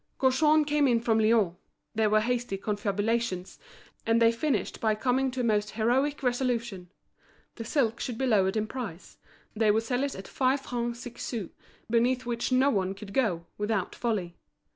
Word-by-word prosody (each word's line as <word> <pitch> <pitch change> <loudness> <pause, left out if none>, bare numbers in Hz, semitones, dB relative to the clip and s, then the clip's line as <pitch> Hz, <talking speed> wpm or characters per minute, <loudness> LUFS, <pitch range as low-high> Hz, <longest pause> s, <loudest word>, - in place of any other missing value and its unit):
Gaujean 300 +4 +4
came 295 -1 +2
up 235 -2 +2
from 225 -1 +3
Lyons; 215 -5 +3 0.4
there 220 -1 +2
were 215 0 +4
hasty 240 -2 -1
confabulations, 205 -1 -2 0.4
and 230 +1 +2
they 230 0 +5
finished 270 +5 -1
by 220 -1 +2
coming 260 +4 +1
to 255 0 -3
a - - -2
most 210 -2 +1
heroic 260 +6 +1
resolution; 240 -7 -1 0.6
the 230 - -7
silk 230 -1 0
should 240 -3 -4
be 265 - 0
lowered 200 -4 +2
in 215 - 0
price, 215 -7 -7 0.4
they 220 0 +2
would 220 +2 +3
sell 245 +2 -1
it 280 - -2
at 190 - -8
five 265 +1 +1
francs 240 -2 -3
six 245 -1 -9
sous, 220 -8 -4 0.4
beneath 245 +3 +1
which 240 +1 -2
no 260 +2 +4
one 195 -3 -1
could 200 0 -10
go, 190 -10 0
without 210 -3 -1
folly. 200 -8 -2
230 Hz, 175 wpm, -28 LUFS, 210-255 Hz, 0.6 s, they